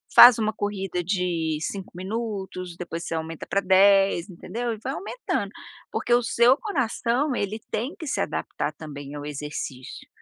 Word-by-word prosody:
Faz 240 -1 +11
uma 215 0 +1
corrida 195 -4 -2
de 170 -4 0
5 195 +3 -4
minutos 190 -2 -4
depois 170 -1 -5
você - - -4
aumenta 160 0 -5
pra 200 - +2
10 195 -1 +5
entendeu? 235 +6 -4
E 220 - -8
vai 265 - -2
aumentando 460 +8 -3 0.4
porque 240 - 0
o 240 0 +4
seu 240 +2 +5
coração 265 - 0
ele 205 +1 -2
tem 240 +7 -2
que 315 - -7
se - - 0
adaptar - - -2
também 145 -2 -8
ao 145 0 -6
exercício, 145 -3 -6
195 Hz, 160 wpm, -25 LUFS, 170-235 Hz, 0.4 s, Faz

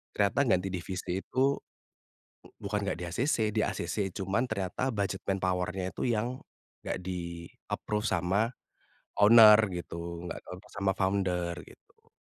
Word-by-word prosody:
ternyata 100 +5 +2
ganti 95 -4 +2
divisi 90 +1 -3
itu 135 +2 +1 0.8
u - - -16
bukan 105 +1 -2
nggak 90 - -2
di-acc, 90 - 0 0.2
di-acc. 110 - -1 0.2
Cuman 95 +5 0
ternyata 110 +5 -1
budget 100 -4 -2
manpower-nya 95 -1 -1
itu - - -5
yang 120 +3 -1 0.4
nggak - - -3
di-approved 90 +4 -4
sama 95 +5 +1 0.7
owner 105 0 +9 0.2
gitu, 85 -1 -6
nggak - - -5
dilepas 95 +3 -11
sama 100 -1 +2
founder 95 -3 0
gitu. - - -21
95 Hz, 125 wpm, -30 LUFS, 90-105 Hz, 0.8 s, owner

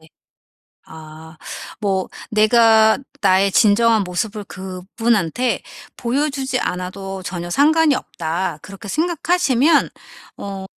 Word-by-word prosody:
네. 160 - -20 0.8
아 160 0 -12 0.4
뭐 195 -3 -1 0.2
'내가 220 +1 +4 0.2
나의 195 0 +3
진정한 220 +1 +4
모습을 205 +4 -3
그분한테 190 +4 -2 0.3
보여주지 265 +1 -1
않아도 185 +1 -5
전혀 175 -1 -5
상관이 305 - +3
없다.' 165 -1 -4
그렇게 195 +1 -11
생각하시면 330 - +2 0.5
어 195 -1 -6
205 Hz, 225 characters per minute, -19 LUFS, 185-245 Hz, 0.8 s, 내가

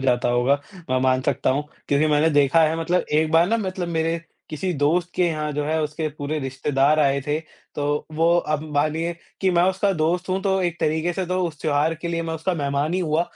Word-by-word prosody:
जाता 125 -2 +1
होगा। 120 +3 +3 0.4
मैं 130 - +2
मान 130 0 +3
सकता 135 -1 0
हूँ 145 +3 0 0.2
क्योंकि 145 +2 +3
मैंने 150 +1 +3
देखा 145 +2 +4
है 160 +1 +2
मतलब 175 +2 +1
एक 155 +1 +2
बार 165 +2 +5
ना 230 - +2
मतलब 185 -4 -3
मेरे 165 0 0 0.3
किसी 180 +4 -2
दोस्त 160 +5 +1
के - - +1
यहाँ 155 -2 -2
जो 145 0 -2
है 160 +1 0
उसके 155 +1 -2
पूरे 150 +1 -2
रिश्तेदार 135 +2 +1
आए 140 -1 +2
थे। 150 +1 0 0.4
तो 145 0 -1
वो 165 +2 +2 0.2
अब 150 - -1
मानिए 155 +3 0 0.3
कि 190 - +2
मैं 175 -1 +3
उसका 195 +1 0
दोस्त 175 +3 0
हूँ 185 +1 0
तो 190 -1 +1
एक 175 -1 -2
तरीक़े 160 +3 0
से 185 +1 -2
तो 185 +1 -1
उस 155 -3 -8
त्योहार 155 +1 +1
के 170 +2 -6
लिए 165 0 -1
मैं 165 0 -3
उसका 175 +3 -1
मेहमान 145 +1 -1
ही 185 - 0
हुआ। 160 -1 +1
155 Hz, 225 wpm, -23 LUFS, 145-170 Hz, 0.4 s, बार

